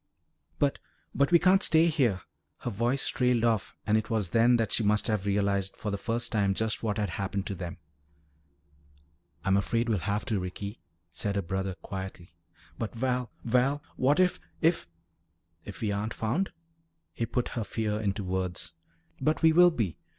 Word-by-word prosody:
"But 140 -1 +1 0.3
but 140 +2 +2
we 175 - +8
can't 190 +3 +4
stay 160 -3 +5
here 125 - +2 0.2
" - - -50
Her 120 - -3
voice 120 +6 0
trailed 125 -2 +2
off 115 -4 +1
and 105 - +3
it 110 - -6
was 105 -7 -1
then 120 +1 +5
that 115 -1 0
she - - +2
must 105 0 +2
have 105 -4 -1
realized 100 -1 +1
for 105 - -3
the 100 - -1
first 115 +3 -2
time 100 -4 +2
just 110 +1 0
what 110 -2 -1
had 105 -4 -1
happened 100 +1 -3
to - - -3
them. 90 -2 -6 1.7
"I'm 95 -1 +3
afraid 115 +4 0
we'll 105 -4 +2
have 100 +3 -2
to, 105 -4 0
Ricky," 100 +4 -6 0.3
said 100 +2 -2
her 100 - 0
brother 95 +2 -2
quietly. 95 -3 -7 0.5
"But, 115 +1 -4
Val 125 0 -1
Val, 130 +5 +2
what 140 +5 +3
if 180 -1 +3 0.2
if 165 - +2 0.4
" 80 0 -43
"If 100 - -9
we 105 -2 0
aren't 105 +2 -2
found?" 130 - -1 0.6
he 115 - -2
put 120 +2 -1
her 115 - -3
fear 105 +1 -2
into 100 -1 -1
words. 90 -3 -2 0.5
"But 155 +4 0
we 160 0 +7
will 175 +2 +8
be. 115 - -2
110 Hz, 180 wpm, -29 LUFS, 100-125 Hz, 1.7 s, we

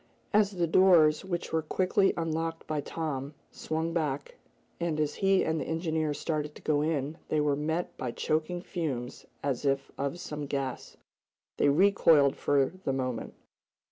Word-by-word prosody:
As 210 -1 +5
the 180 -4 -1
doors, 165 -3 +5
which 175 -4 -4
were 160 - +2
quickly 185 +5 +2
unlocked 165 0 -2
by 155 -1 -2
Tom, 145 -2 -4 0.2
swung 160 +1 -3
back, 145 -4 -2 0.4
and 170 -3 -1
as 150 -1 0
he 195 -1 +2
and 160 0 0
the - - -3
engineer 160 -1 -1
started 150 -1 -3
to - - -12
go 150 -2 +2
in, 150 0 -1
they 155 - +1
were 150 -1 +2
met 160 +4 -2
by 125 - -3
choking 160 +7 -1
fumes 135 -10 -4 0.2
as 135 -3 -1
if 135 -1 0
of 140 +5 -2
some 150 -3 -5
gas. 135 -2 -4 0.6
They - - +4
recoiled 160 -4 +5
for 140 -1 +2
the 135 - 0
moment. 130 -3 -3
155 Hz, 160 wpm, -29 LUFS, 140-165 Hz, 0.6 s, As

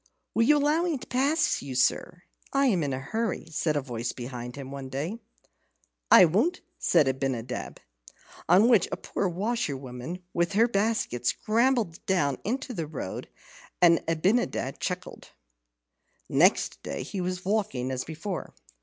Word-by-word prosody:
"Will 230 - +2
you 300 +4 +5
allow 295 +3 +2
me 345 -4 0
to - - -10
pass 275 +6 +1
you, 135 -2 -6
sir? 170 +7 +1 0.3
I 275 0 +3
am 200 -10 +3
in 145 -2 -1
a 130 - -2
hurry," 220 - -3
said 155 0 0
a 145 - +1
voice 120 -2 -4
behind 125 -1 -7
him 135 -1 -8
one 135 -1 -6
day. 155 - -4 0.9
"I 185 - +9
won't," 225 - +1 0.2
said 145 - +3
Abinadab; 130 -2 -3 0.7
on 190 +6 +6
which 230 -7 +5
a - - -2
poor 195 - -2
washerwoman, 170 - -3
with 170 +2 0
her 225 +4 +4
basket, 200 - 0
scrambled 230 - +1
down 145 -8 +1
into 255 +3 -3
the 165 -7 -3
road, 140 -11 -6 0.5
and 170 -2 +5
Abinadab 165 - 0
chuckled. 180 -1 -5 0.9
Next - - +3
day 70 - -4
he 195 - -4
was 180 0 -3
walking 195 - -1
as 130 -1 -2
before. 165 +4 -6
175 Hz, 150 wpm, -27 LUFS, 135-225 Hz, 0.9 s, I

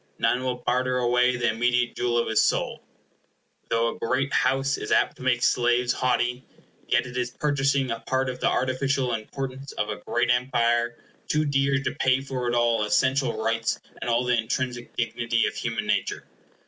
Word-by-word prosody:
None 125 - +1
will 130 -1 -1
barter 125 +1 +1
away 125 0 +2
the 120 -1 0
immediate 120 +1 +1
jewel 120 -1 0
of 120 - +1
his 110 - +3
soul. - - 0 0.9
Though 115 0 +2
a - - -15
great 135 +4 -1
house 135 +2 +2
is - - -6
apt - - +2
to - - -14
make 130 -1 +1
slaves 120 0 +2
haughty, 125 0 0 0.4
yet - - +2
it 125 -1 -9
is 125 -1 -1
purchasing 140 -1 0
a 115 - -3
part 130 +3 -1
of 125 0 -4
the - - +2
artificial 130 0 0
importance 130 +4 -5
of 105 - -2
a 105 - -3
great 120 - +1
empire 120 -1 +1 0.3
too 155 0 +1
dear 140 -1 +2
to - - -1
pay 130 0 +3
for 130 -2 -4
it 120 - 0
all 120 -2 +2
essential 130 +2 +1
rights 115 0 0 0.2
and - - -3
all 120 +1 +2
the 125 0 +2
intrinsic 120 +1 -3
dignity 115 -1 0
of - - -1
human - - -3
nature. - - -1
125 Hz, 185 wpm, -25 LUFS, 120-130 Hz, 0.9 s, his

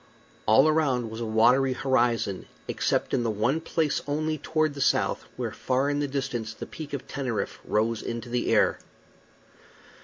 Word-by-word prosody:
All 130 +7 +6
around 135 -7 +1
was 110 +1 -6
a 115 - -2
watery 125 +5 +4
horizon, 120 -7 0 0.2
except - - 0
in - - +2
the 115 - 0
one 120 +9 0
place 160 -2 0
only, 155 +1 -1
toward 155 0 0
the 140 - -6
south, - - +1
where - - -2
far 135 +2 0
in 145 - 0
the 145 - 0
distance 130 -5 -3
the - - -6
Peak 155 -2 -8
of 140 -1 -4
Teneriffe 130 -5 -3
rose 110 +1 0
into 115 0 -5
the 120 0 -1
air. - - +3
130 Hz, 165 wpm, -27 LUFS, 115-145 Hz, 0.2 s, All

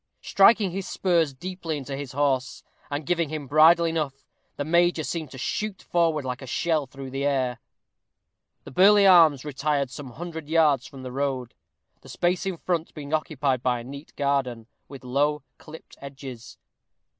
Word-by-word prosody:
Striking 200 -1 +4
his 190 +1 -5
spurs 170 -5 +1
deeply 170 +2 -5
into 135 0 -6
his 135 -2 -7
horse, 135 -2 -1 0.3
and 145 +1 -4
giving 170 -2 0
him 155 -2 -5
bridle 160 +4 +5
enough, 155 -4 -3 0.3
the 145 - -3
major 170 0 +2
seemed 160 -3 -4
to 130 - -11
shoot 205 - -3
forward 165 -4 +1
like 125 +1 -4
a 135 - -9
shell 155 +2 0
through 135 0 -9
the 135 +1 -3
air. 130 -4 0 1.0
The - - -11
Burleigh 200 +6 +6
Arms 160 -7 +6
retired 145 -1 -1
some 130 -2 -9
hundred 160 -2 -7
yards 155 -5 +3
from 135 -2 -11
the 130 - -6
road, 130 -2 -2 0.5
the - - -15
space 180 +2 0
in 185 -3 -3
front 170 -1 -3
being 150 -1 -7
occupied 145 -5 0
by 125 -1 0
a - - -8
neat 140 +4 -10
garden, 135 -5 -1 0.2
with 135 -3 -11
low, 145 +3 0 0.2
clipped 155 +1 -13
edges. 135 -3 -9
145 Hz, 165 wpm, -25 LUFS, 135-165 Hz, 1.0 s, Burleigh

